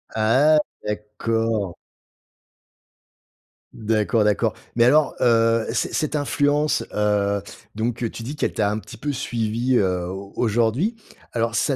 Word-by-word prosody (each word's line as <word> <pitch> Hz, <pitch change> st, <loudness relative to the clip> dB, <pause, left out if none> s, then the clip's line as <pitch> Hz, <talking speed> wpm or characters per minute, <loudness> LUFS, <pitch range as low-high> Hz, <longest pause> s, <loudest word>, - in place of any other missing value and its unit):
Ah! 130 Hz, +8 st, +4 dB, 0.3 s
D'accord. 105 Hz, -2 st, -2 dB, 2.0 s
D'accord, 110 Hz, 0 st, +1 dB
d'accord 105 Hz, -1 st, +1 dB, 0.2 s
mais 115 Hz, -, +5 dB
alors, 150 Hz, +3 st, +4 dB
heu, 115 Hz, -1 st, +3 dB
cet -, -, -1 dB
cette 155 Hz, -1 st, -1 dB
influence, 145 Hz, +1 st, +1 dB
heu, 100 Hz, -1 st, +1 dB, 0.3 s
donc, 115 Hz, +2 st, -2 dB
heu, 115 Hz, -, 0 dB
tu 115 Hz, -, -8 dB
dis 140 Hz, +6 st, -5 dB
qu'elle -, -, -1 dB
t'a 105 Hz, -1 st, +1 dB
un 105 Hz, -, -2 dB
petit 115 Hz, -, -11 dB
peu 145 Hz, +4 st, -2 dB
suivie, 120 Hz, -1 st, -1 dB
heu, 90 Hz, -2 st, 0 dB
au 95 Hz, +2 st, -7 dB
aujourd'hui. 120 Hz, -, +1 dB, 0.4 s
Alors, 115 Hz, -1 st, 0 dB
ça 135 Hz, +4 st, +1 dB
115 Hz, 135 wpm, -22 LUFS, 105-130 Hz, 2.0 s, mais